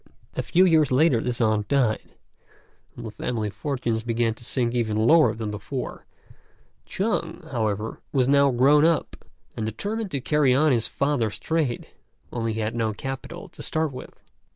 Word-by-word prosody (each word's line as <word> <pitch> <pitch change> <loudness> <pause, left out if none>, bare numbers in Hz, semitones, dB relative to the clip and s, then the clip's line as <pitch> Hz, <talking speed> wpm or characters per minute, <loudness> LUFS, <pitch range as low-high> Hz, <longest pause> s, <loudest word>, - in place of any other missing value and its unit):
A - - -2
few 170 +10 +3
years 155 -6 +4
later 130 -3 +4
this 125 0 -2
aunt 110 -3 +1
died, 125 -5 0 0.8
and 120 - -8
the 110 - -5
family 110 -1 -3
fortunes 120 -4 -2
began 115 0 0
to 115 - -16
sink 120 0 -1
even 110 -3 0
lower 150 -6 +5
than 110 -1 -4
before; 105 +6 -6 0.8
Chung, - - -2
however, 110 -1 -2
was 130 -3 +2
now 140 0 +5
grown 135 +4 +4
up, 165 0 +2 0.4
and 110 - -3
determined 205 - -3
to 140 - -2
carry 140 -1 +2
on 150 +2 +4
his 115 -3 +1
father's 140 -7 -1
trade, 155 -7 -1 0.5
only 115 -2 -1
he 110 - -3
had 110 +1 -2
no 115 -2 -1
capital 135 - -6
to - - -12
start 160 -2 -1
with. 130 - -10
125 Hz, 165 wpm, -25 LUFS, 110-145 Hz, 0.8 s, lower